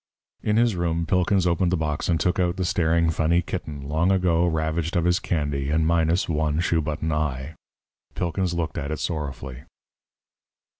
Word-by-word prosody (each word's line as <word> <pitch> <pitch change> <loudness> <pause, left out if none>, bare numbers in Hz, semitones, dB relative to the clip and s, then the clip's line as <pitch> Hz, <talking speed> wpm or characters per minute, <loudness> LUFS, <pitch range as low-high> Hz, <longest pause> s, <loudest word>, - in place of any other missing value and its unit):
In 105 0 +1
his 115 -3 +3
room, 85 -1 -1
Pilkins 90 +3 +2
opened 85 0 +2
the 90 - +2
box 75 0 -2
and 85 -2 +2
took 90 +1 +1
out 90 -1 +1
the 95 - -1
staring, 85 -2 +2
funny 85 +2 +2
kitten, 75 -5 -5
long 80 +5 +1
ago 90 -2 +2
ravaged 80 +1 -1
of 85 -1 +2
his 90 +2 +3
candy 75 -6 -2
and 80 +1 +2
minus 85 +2 +2
one 75 -2 0
shoe 85 -1 +1
button 75 +1 -2
eye. 75 -1 -2 0.6
Pilkins 90 0 -1
looked 80 -2 -2
at 70 - -4
it 80 - -2
sorrowfully. 70 -5 -4
85 Hz, 170 wpm, -24 LUFS, 75-90 Hz, 0.6 s, his